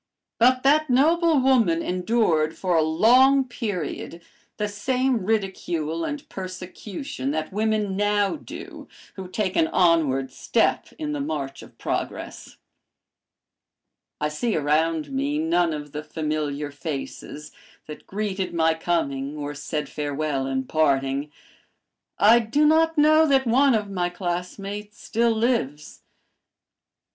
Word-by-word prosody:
But 255 +2 +4
that 300 +2 +4
noble 320 +4 +4
woman 230 -11 +3
endured 180 -4 +1
for 180 -2 0
a 160 - +4
long 250 - +4
period 185 - -5 0.3
the 210 - -1
same 250 +3 0
ridicule 175 -6 -1
and 290 - -5
persecution 185 - -6
that 155 +4 -3
women 215 -2 0
now 205 +2 +1
do 300 - -10 0.3
who 190 -2 -8
take 185 0 -2
an 160 - +3
onward 155 -8 +2
step - - 0
in 305 -1 -3
the 295 - -3
march 140 - -4
of - - -15
progress. - - -5 1.6
"I 150 - 0
see 210 +9 -1
around 155 0 0
me 140 +2 -1
none 165 +2 +1
of 150 -1 -6
the 150 - -5
familiar 150 -2 -3
faces 150 0 -6 0.3
that 150 - -10
greeted 195 -3 -3
my 160 -1 +3
coming 150 -4 -2
or 145 0 -4
said 150 +1 -4
farewell 145 -2 -2
in 130 -1 -1
parting. 140 -1 0 0.9
I 225 +3 +6
do 240 +7 +1
not 320 +1 +3
know 310 +1 +5
that 270 -2 +3
one 260 +2 +4
of 210 -2 -2
my 180 -2 -1
classmates 195 +3 -5
still 230 +1 +1
lives. 220 - -1
180 Hz, 125 wpm, -24 LUFS, 150-230 Hz, 1.6 s, I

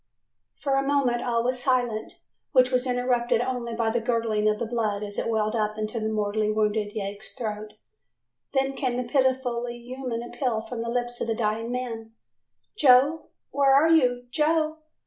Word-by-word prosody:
"] - - -56
For 275 - +1
a - - +3
moment 265 -4 +2
all 235 -1 0
was 250 0 -1
silence, 245 -4 -1 0.3
which 255 -1 +5
was 255 0 +1
interrupted 245 -2 +1
only 240 -2 -2
by 225 -1 0
the 235 - +1
gurgling 225 -2 +1
of 210 - 0
the 235 - -2
blood 215 -3 -1
as 205 -1 -4
it - - -2
welled 215 0 0
up 215 -1 -1
into 215 +2 -3
the 220 0 -1
mortally 215 0 0
wounded 210 -1 0
yegg's 205 0 -6
throat, 215 -4 -5 0.8
then 270 0 +1
came 255 -3 -2
the 250 - -3
pitifully 250 -3 0
human 245 -1 -5
appeal 240 -1 -2
from 230 +1 -6
the 230 - -3
lips 240 0 -2
of - - -1
the 225 - 0
dying 225 +1 -1
man, 230 -3 -5 0.6
"Joe, 285 0 +5 0.2
where 275 -1 +4
are 305 +4 +5
you, 250 -6 +3
Joe? 310 +2 +1
240 Hz, 180 wpm, -26 LUFS, 220-255 Hz, 0.8 s, which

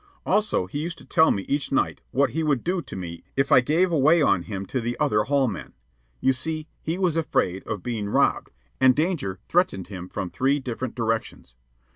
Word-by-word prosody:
Also, 210 - +1
he 100 +11 -5
used 165 +2 -4
to - - -15
tell 160 - +4
me 100 - 0
each 140 +4 -1
night 135 - 0
what 140 +2 +2
he 160 - -1
would 145 -6 +1
do 180 +1 0
to - - -10
me 85 -2 -7
if 135 +1 +1
I 130 - +8
gave 165 +8 +2
away 160 +2 +4
on 100 - +3
him 100 +1 -5
to 130 +5 -2
the 120 +1 -3
other 105 0 +2
hall 140 -1 +2
men. 105 - -6 0.5
You 130 - +3
see, 155 +4 -3
he 165 +3 -2
was 180 -4 +1
afraid 95 - 0
of 105 -4 -4
being 110 -4 -3
robbed, - - +2 0.3
and 130 -1 +6
danger 150 - -1
threatened 100 - +1
him 90 -3 -7
from 90 - -4
three 135 +2 +1
different 130 -1 -5
directions. 115 - -3
130 Hz, 205 wpm, -25 LUFS, 105-160 Hz, 0.5 s, I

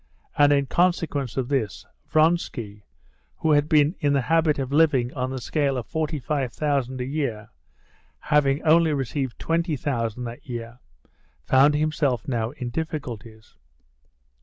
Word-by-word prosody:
And 145 0 +5
in 140 -1 +3
consequence 155 -5 0
of 130 -2 -1
this, 120 -9 -2 0.2
Vronsky, 155 - 0 0.5
who 160 - +1
had 145 0 +3
been 150 -1 +4
in 145 -1 +1
the 140 - +2
habit 160 +2 +2
of 135 -1 -3
living 140 -5 +3
on 130 -2 -2
the 130 0 -4
scale 140 +1 -1
of 120 - -4
forty 160 -1 -2
five 135 -2 -2
thousand 135 -2 -1
a - - -2
year, 125 -6 -3 0.7
having 150 -1 +2
only 160 0 +4
received 135 -2 -3
twenty 165 -1 -1
thousand 120 -4 -2
that 120 +2 -8
year, 120 0 -6 0.7
found 140 +3 +5
himself 150 -5 0
now 115 -4 -1
in 125 -2 -6
difficulties. 120 -8 -6
140 Hz, 145 wpm, -24 LUFS, 125-155 Hz, 0.7 s, And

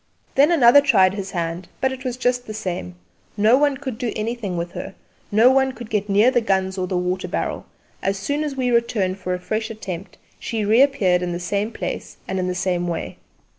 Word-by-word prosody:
Then 285 +5 +5
another 285 -4 +7
tried 195 -10 +4
his 195 -1 -5
hand; 170 0 -3
but 265 - +1
it 260 0 -7
was 250 -2 -3
just 250 0 0
the 215 - -6
same. 175 - -4 0.4
No 215 +4 +5
one 285 0 +2
could 260 -5 -6
do 245 -3 -1
anything 215 -4 -3
with 170 +1 -3
her; 195 - -7 0.4
no 225 +5 +6
one 265 0 +2
could 240 -3 -10
get 210 -1 -1
near 210 +5 +5
the 240 - +2
guns 190 -3 0
or 185 -1 -2
the 180 - -1
water 180 +1 -1
barrel; - - -3 0.3
as 195 +1 0
soon 285 +9 -2
as 295 -3 -3
we 255 -2 0
returned 210 -5 +1
for 180 -1 -2
a - - -6
fresh 215 +4 -3
attempt 195 -4 -7 0.2
she 220 -2 -2
reappeared 215 -6 +4
in 175 -1 -2
the 175 - -3
same 200 +4 -2
place - - -5
and 190 0 -2
in 185 - -1
the 180 - -2
same 180 -1 -1
way. 170 -1 -4
210 Hz, 215 wpm, -22 LUFS, 185-245 Hz, 0.4 s, another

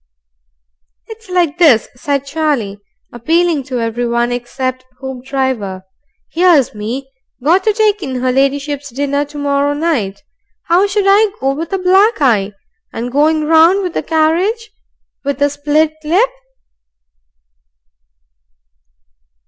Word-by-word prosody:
"It's 445 -2 -11
like 350 -3 0
this," 280 -11 +5
said 280 +2 -2
Charlie, 275 -9 -2 0.3
appealing 325 +6 +1
to 255 -2 -3
everyone 235 +1 -1
except 255 +1 -4 0.2
Hoopdriver. 260 -7 -3 0.5
"Here's 335 -6 +3
me, 240 +6 -5 0.3
got 350 +6 +3
to 435 - +4
take 420 -1 +1
in 265 -5 -4
her 255 0 0
ladyship's 280 +2 -1
dinner 280 +3 -1
to 290 +1 -11
morrow 285 0 0
night. 290 -9 -2 0.4
How 360 +4 +3
should 405 0 0
I 405 +2 +5
look 270 +1 0
with 330 +4 -5
a 385 - 0
black 385 +5 +3
eye? 215 -8 +2 0.4
And 240 +2 -5
going 305 +3 +2
round 330 +5 +4
with 360 -2 -3
the - - -1
carriage 360 +8 0 0.5
with 280 -1 -2
a 285 0 +2
split 300 +2 +1
lip?" 380 +11 +2
285 Hz, 125 wpm, -15 LUFS, 255-340 Hz, 0.5 s, this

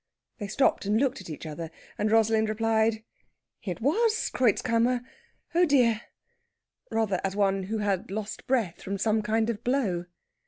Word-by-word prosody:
They 205 - -4
stopped 215 -1 +1
and 210 +1 +3
looked 265 -5 0
at 180 - -11
each 155 +1 -7
other, 160 +1 -6 0.3
and 210 - 0
Rosalind 220 -1 +3
replied, 220 0 +1 0.6
"It 185 +1 -5
was 435 - +1
Kreutzkammer. 240 +1 +2 0.5
Oh 350 +2 +5
dear!" 245 -7 +3 0.9
rather 220 -5 0
as 195 0 -2
one 195 -2 +1
who 220 +3 -2
had 200 -3 -1
lost 210 +1 -5
breath 230 -10 0
from 200 +1 -3
some 215 +2 +1
kind 220 +1 +1
of 225 0 -8
blow. 220 -10 0
220 Hz, 155 wpm, -27 LUFS, 200-235 Hz, 0.9 s, Oh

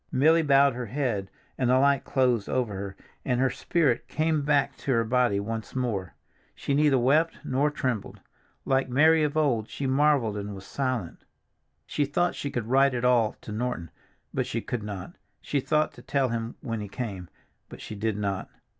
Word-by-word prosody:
Milly 160 +5 +4
bowed 140 -2 +4
her 125 -1 -5
head 110 -6 -2 0.3
and 125 -2 +2
the 130 - +5
light 140 0 +3
closed 125 -6 +1
over 125 -5 0
her 95 0 -5 0.3
and 125 -2 0
her 130 0 +2
spirit 150 -9 0
came 155 -1 0
back 145 -1 +1
to - - -7
her 115 -2 +3
body 120 -3 +2
once 110 +3 -5
more. 110 -8 -2 0.4
She 140 - -2
neither 145 -1 +4
wept 150 +7 +2
nor 140 +3 +1
trembled; 130 -7 -3 0.5
like 135 -1 +1
Mary 155 +5 +5
of 150 0 0
old 120 -8 +1
she 140 - -4
marveled 135 -5 +2
and 100 0 -5
was 95 0 -10
silent. 130 -10 -3 0.6
She 145 - 0
thought 175 +5 0
she 140 - -4
would 120 -5 -3
write 135 +2 +3
it 120 0 -1
all 120 -3 +3
to - - -9
Norton, 110 -7 -3 0.4
but - - -1
she 115 - -2
could 120 0 -4
not; 100 -3 -6 0.3
she 145 - -1
thought 155 +3 +1
to - - -13
tell 135 -3 0
him 115 0 -3
when 115 -5 -3
he 105 - -5
came, 100 -5 -6 0.4
but - - -10
she - - -8
did 105 0 -2
not. 100 -2 -2
125 Hz, 190 wpm, -27 LUFS, 110-140 Hz, 0.6 s, the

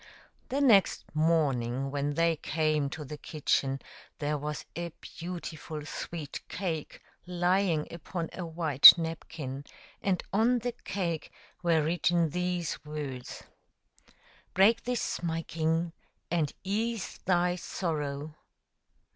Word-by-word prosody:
The 275 +3 0
next 220 -9 +5
morning 135 -5 +1
when 145 0 -1
they 165 0 +3
came 155 -2 0
to 150 +1 -6
the 150 +2 -8
kitchen 135 -3 0 0.4
there 150 0 -1
was 150 +1 -4
a 170 0 -3
beautiful 165 -3 -7
sweet 155 -2 -6
cake 165 -5 -4 0.2
lying 180 -2 +1
upon 170 0 -5
a 185 - -5
white 160 -3 +9
napkin, 160 -4 -5 0.4
and 190 -3 0
on 230 +5 +4
the 245 +1 -2
cake 180 -4 -2 0.3
were 165 -3 +3
written 170 0 +2
these 180 -1 -2
words: 145 -4 -6 0.5
" - - -30
Break 210 +5 +5
this, 245 -7 -1
my 165 -1 -1
king, 165 +1 -1 0.4
and 160 -4 +1
ease 215 +2 -2
thy 180 -1 +2
sorrow." 150 -5 -3
165 Hz, 115 wpm, -30 LUFS, 150-180 Hz, 0.5 s, white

